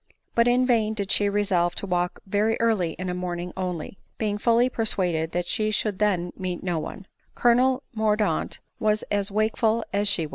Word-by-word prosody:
But 235 0 +3
in 250 +1 +3
vain 220 -3 +2
did 200 -2 -3
she 205 -1 +3
resolve 190 -4 +1
to - - -1
walk 180 -1 -1
very 210 +3 +1
early 210 -8 +1
in 185 - -6
a 180 - -2
morning 180 -1 -4
only, 180 -1 -4 0.2
being 210 -2 -1
fully 235 +2 +3
persuaded 180 -9 +1
that 175 0 -1
she 215 +3 0
should 210 -2 -1
then 180 -5 +1
meet 185 -2 -4
with - - -10
no 175 -3 0
one. 190 +5 -7 0.3
Colonel 255 +2 +3
Mordaunt 215 -5 0 0.2
was 215 0 +1
as 205 -1 0
wakeful 220 +2 +1
as 205 +1 +2
she. 165 -5 +3
205 Hz, 185 wpm, -25 LUFS, 180-220 Hz, 0.3 s, But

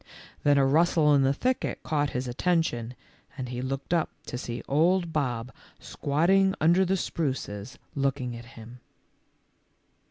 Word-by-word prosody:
Then 145 -1 +4
a 135 - +4
rustle 155 +1 +4
in 140 - +5
the 135 0 +3
thicket 255 - -1
caught 145 -2 0
his 125 0 -3
attention 125 -4 0 0.4
and 130 -2 -4
he 125 0 -4
looked 135 +4 -3
up 165 -3 +1 0.2
to - - -6
see 120 -1 -5
old 170 +3 +2
Bob 125 -5 -1 0.3
squatting 190 +7 +2
under 170 +4 +4
the 190 +1 +1
spruces 130 - -3 0.2
looking 135 -3 -1
at 120 0 -9
him. 115 +2 -11
140 Hz, 145 wpm, -27 LUFS, 125-165 Hz, 0.4 s, in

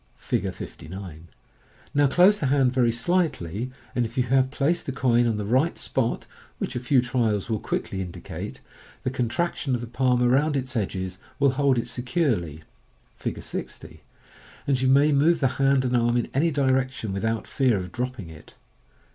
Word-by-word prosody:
(See - - -1
Fig. - - -3
59.) 85 -2 -9 0.7
Now 145 0 +4
close 180 +9 +5
the 140 - 0
hand 130 -2 +3
very 125 -2 +3
slightly, 120 - 0 0.3
and 125 - +2
if 115 +1 -6
you 125 - +3
have 130 +1 +2
placed 150 +5 0
the - - -1
coin 120 -2 +2
on 110 -2 0
the 105 - -3
right 130 +10 +2
spot 120 -3 -1 0.3
(which 125 - -4
a - - 0
few 125 +1 +3
trials 115 -4 0
will 110 - 0
quickly 95 0 -3
indicate), 90 -2 -7 0.4
the 130 - -1
contraction 130 +2 -1
of 120 - -4
the - - -4
palm 125 +1 +1
around 140 +4 +3
its 130 -1 -4
edges 95 -3 -3 0.2
will 140 -1 +4
hold 135 -1 +2
it 120 - 0
securely 120 - -1 0.6
(see - - -2
Fig. - - -9
60), - - -7 0.6
and 135 -2 +1
you 130 - +2
may 140 +3 +5
move 155 +4 +4
the 135 - +3
hand 135 -1 +3
and 125 0 +1
arm 120 0 +2
in 120 - -2
any 155 +5 +2
direction 130 -6 0
without 110 +3 -1
fear 130 -6 +1
of 90 -2 -5
dropping 125 -5 -4
it. 80 -1 -14
125 Hz, 180 wpm, -25 LUFS, 115-135 Hz, 0.7 s, close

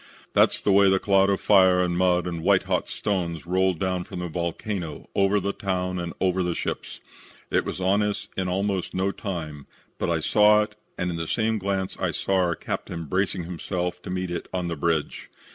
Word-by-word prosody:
That's - - +4
the 100 - +1
way 100 0 +6
the 95 - +4
cloud 95 0 +3
of 100 - +1
fire 95 -3 +5
and 90 -1 0
mud 90 -1 +2
and 85 -2 -3
white - - +3
hot - - -1
stones 85 -6 -2
rolled 95 0 +1
down 90 0 -1
from - - -9
that 90 -2 -4
volcano 85 0 -4
over 100 +1 +3
the 100 +1 -2
town 90 -1 -2
and 85 -1 -4
over 95 0 +1
the 90 -2 -1
ships. - - -4 0.5
It - - +2
was - - -4
on 95 +3 +2
us 105 -1 -2
in 95 -1 -1
almost 95 0 -1
no 95 +1 +1
time, 80 -9 -6 0.3
but - - -1
I 85 -1 +1
saw 105 +5 +5
it 105 0 -9 0.2
and 90 0 -1
in 85 - -4
the 80 -1 -3
same 110 +2 0
glance 95 -1 -2
I - - 0
saw 95 - 0
our 90 -2 +2
captain 85 0 -5
bracing 95 +2 -1
himself 90 +1 -3
to - - -8
meet 90 -1 -2
it 85 - -4
on 90 -2 -2
the 85 - -2
bridge. 80 -1 -1
90 Hz, 210 wpm, -25 LUFS, 85-100 Hz, 0.5 s, way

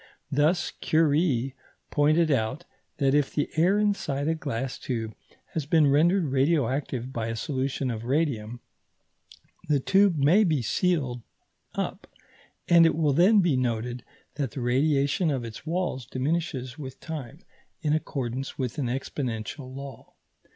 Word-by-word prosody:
Thus 155 +5 +2
Curie 145 -5 +2 0.4
pointed 155 +2 +3
out 130 +6 -1 0.3
that 135 -2 +2
if 145 -1 +1
the 145 - 0
air 180 +6 +3
inside 195 -9 0
a 160 - +2
glass 135 -5 -4
tube 115 -4 -3 0.4
has 155 -3 -3
been 160 -1 +4
rendered 170 +6 +4
radioactive 135 -2 0
by 115 -1 -2
a 115 - -3
solution 135 +1 -2
of 110 -1 -5
radium, 120 -5 -1 1.1
the 145 -2 +3
tube 195 +4 +3
may 160 +10 +5
be 155 - +1
sealed 135 - 0 0.5
up, - - -4 0.6
and 170 -1 +7
it - - +1
will 155 -3 +2
then 195 +7 +5
be 170 -6 +2
noted 120 -1 -2 0.3
that 140 -4 -1
the 130 - -6
radiation 140 +6 +2
of 130 -5 -1
its 115 +7 -9
walls 165 -8 -2
diminishes 135 -1 -2
with 130 -3 -8
time, 155 -1 -7 0.4
in 150 -1 +2
accordance 135 -4 -3
with 130 0 -3
an 130 - 0
exponential 130 0 -4
law. 135 0 -9
140 Hz, 140 wpm, -26 LUFS, 125-160 Hz, 1.1 s, and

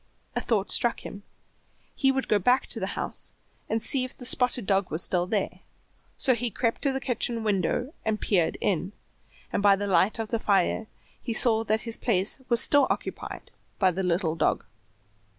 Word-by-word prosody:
A - - 0
thought 210 -4 0
struck 240 - +2
him; 200 - -8 0.7
he 270 -2 +2
would 265 0 -2
go 210 - +3
back 250 +7 +3
to 230 - -3
the 190 0 -4
house - - -4 0.3
and 220 0 -1
see 265 +1 +1
if 255 - -7
the 250 - -5
spotted 250 -2 +1
dog 195 -1 +1
was 155 +3 0
still 180 -1 0
there; 200 -1 -2 0.6
so 260 - +3
he 240 0 -2
crept 230 +2 -1
to 280 - +1
the 265 - -2
kitchen 240 -2 -1
window 210 - 0
and 220 -1 -1
peered 180 -6 +1
in, 190 0 -1 0.6
and - - +1
by 200 -1 +6
the 205 +1 -3
light 200 +2 +2
of 225 -1 -4
the 230 - -1
fire 200 +1 +1 0.3
he 235 - -3
saw 225 0 +3
that 215 +1 +1
his 230 -1 -3
place 205 +1 0
was 235 -1 +5
still 285 -1 +5
occupied - - -5 0.3
by 190 -2 +3
the 185 +2 -3
little 175 -2 0
dog. 165 - 0
220 Hz, 190 wpm, -27 LUFS, 195-245 Hz, 0.7 s, by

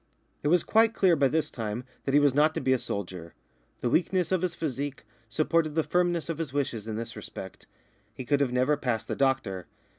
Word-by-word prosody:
It - - -1
was 175 +2 +4
quite 225 0 +3
clear 185 -3 +4
by 140 -3 +3
this 155 +4 0
time 110 +1 -4 0.2
that 135 - -1
he - - +8
was 145 -2 +4
not 150 +3 +3
to - - 0
be 130 - +2
a 130 - +1
soldier. 90 -6 -5 0.5
The 120 - 0
weakness 180 0 +1
of 185 -2 +2
his 180 -2 -1
physique 140 -2 -4 0.3
supported 155 +4 +1
the 160 - +2
firmness 175 -1 +1
of 165 -1 -4
his 160 -5 -3
wishes 120 -7 -2
in 110 - -3
this 115 +1 -5
respect. 95 -3 -9 0.4
He 125 +3 -8
could 145 +3 +2
have 135 -3 +1
never 130 +4 +2
passed 125 -5 -2
the - - -2
doctor. 115 -10 0
140 Hz, 215 wpm, -28 LUFS, 120-160 Hz, 0.5 s, he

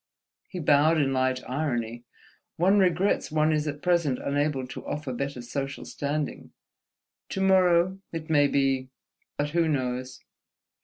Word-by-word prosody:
He 185 - -7
bowed 155 0 +4
in 135 -3 +1
light 130 0 0
irony. 120 -4 -2 0.5
"One 190 +5 +4
regrets 185 -1 +2
one 155 0 +2
is 155 0 0
at 145 0 -5
present 170 -7 +2
unable 145 -1 -1
to - - -7
offer 150 -3 -4
better 135 0 -4
social 135 +3 -4
standing. 145 +1 -4 0.8
To 190 - -3
morrow, 185 -1 +4
it 165 -1 -5
may 145 -3 +4
be... 135 -2 +1 0.5
But 145 0 -1
who 165 0 +2
knows?" 130 -3 -2
145 Hz, 140 wpm, -27 LUFS, 130-165 Hz, 0.8 s, bowed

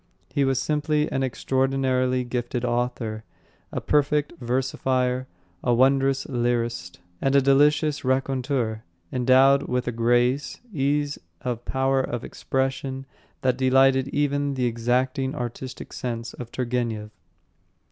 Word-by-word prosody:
He 140 - +2
was 135 -1 +2
simply 150 +1 0
an 135 - 0
extraordinarily 130 -1 +1
gifted 120 0 -3
author, 120 -2 -2 0.5
a - - -2
perfect 150 +1 +1
versifier, 130 0 0 0.4
a 120 -1 +3
wondrous 135 +2 +3
lyrist, 120 -8 -1 0.2
and 135 0 +2
a - - +8
delicious 145 +2 +3
raconteur, 130 -3 0 0.3
endowed 130 +2 +5
with 125 0 -1
a - - +1
grace, 120 +4 +1
ease 145 0 0 0.2
and 120 -2 -3
power 135 0 +1
of 120 -2 -4
expression 135 0 -2 0.4
that 130 -1 +2
delighted 135 0 +4
even 145 0 0
the 125 -1 0
exacting 130 +4 0
artistic 125 +2 -6
sense 115 -1 -4
of 120 -2 -8
Turgenev. 120 -4 -2
130 Hz, 115 wpm, -25 LUFS, 120-135 Hz, 0.5 s, a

